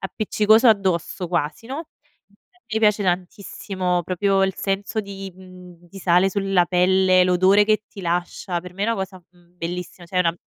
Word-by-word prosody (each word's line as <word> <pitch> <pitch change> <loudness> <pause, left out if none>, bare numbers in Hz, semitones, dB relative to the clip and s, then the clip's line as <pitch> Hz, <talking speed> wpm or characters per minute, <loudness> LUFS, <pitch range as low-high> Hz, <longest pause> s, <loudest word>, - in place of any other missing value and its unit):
appiccicoso 215 +4 +2
addosso, 185 -3 0
quasi, 170 +4 -2
no, 290 +6 -6 0.4
infatti 230 +4 -34
mi - - +3
piace 210 -1 +3
tantissimo 180 0 -2
proprio 195 +2 +1
il 190 -1 -2
senso 200 +3 -2
di, 195 -1 -8
mhmm, 185 -1 -14
di 175 +3 -13
sale 180 +1 +3
sulla 195 -3 +1
pelle, 185 +1 +3
l'odore 185 +3 +4
che 215 0 +2
ti 200 - -11
lascia, 175 0 -2
per 180 +1 -11
me 195 +2 -5
è - - -1
una 230 - +1
cosa, 190 -2 -6
mhmm, 175 0 -27
bellissima, 175 +1 -6
cioè 185 - -7
è - - +4
una 165 -1 +1
190 Hz, 175 wpm, -22 LUFS, 180-200 Hz, 0.4 s, l'odore